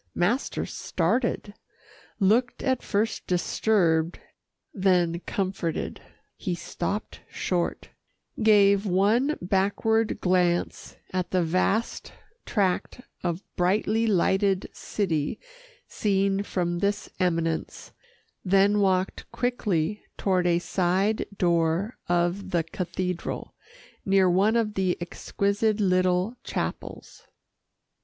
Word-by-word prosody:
Master 215 +10 0
started, 235 -4 -1 0.7
looked 230 +5 +2
at 260 -2 +1
first 220 +2 -1
disturbed, 175 -2 +1 0.6
then 180 -4 +2
comforted. 185 -4 -2 0.3
He 180 - -3
stopped 185 +4 -4
short, 175 -2 -2 0.5
gave 205 -2 +5
one 215 +10 +2
backward 205 +4 +1
glance 180 -1 0 0.2
at 185 -1 -1
the 185 -2 +1
vast 185 +7 0 0.3
tract 195 +3 0 0.2
of 175 +1 -2
brightly 210 +5 +1
lighted 195 -1 +2
city 160 -8 -2 0.5
seen 195 -1 +1
from 175 -3 -2
this 200 +1 -1
eminence, 165 -3 -1 0.5
then 195 +2 +4
walked 190 -1 0
quickly 210 -7 -1 0.2
toward 185 -2 +1
a 170 -1 +3
side 185 +4 0
door 170 +4 +1
of 175 +3 0
the 170 -2 +1
cathedral, 180 +1 -4 0.5
near 195 -1 +4
one 195 +5 +3
of 220 -2 +1
the 190 -3 0
exquisite 200 +5 -1
little 185 +2 +2
chapels. - - -5
190 Hz, 95 wpm, -26 LUFS, 175-210 Hz, 0.7 s, gave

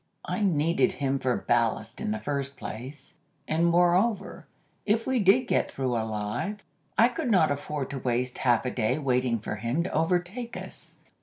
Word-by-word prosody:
I - - -2
needed 170 -3 +2
him 135 -1 -1
for 125 -2 0
ballast 115 -2 0
in 220 - -2
the 215 - -1
first 140 -7 -3
place, 130 +7 -8 0.3
and 165 +2 +2
moreover, 180 +5 +2 0.4
if 220 +2 +1
we 260 -1 +1
did 200 +5 +5
get - - +1
through 130 -2 -2
alive, 110 - -3 0.3
I 230 - +7
could 255 +2 -3
not 180 -8 +4
afford 145 -1 -3
to 140 - -4
waste 125 0 -1
half 120 0 +2
a 125 - -1
day 110 +2 0
waiting 125 -4 +1
for 105 0 -5
him 120 +9 -1
to 185 - -4
overtake 180 +9 -1
us. - - -10
145 Hz, 170 wpm, -27 LUFS, 125-195 Hz, 0.4 s, I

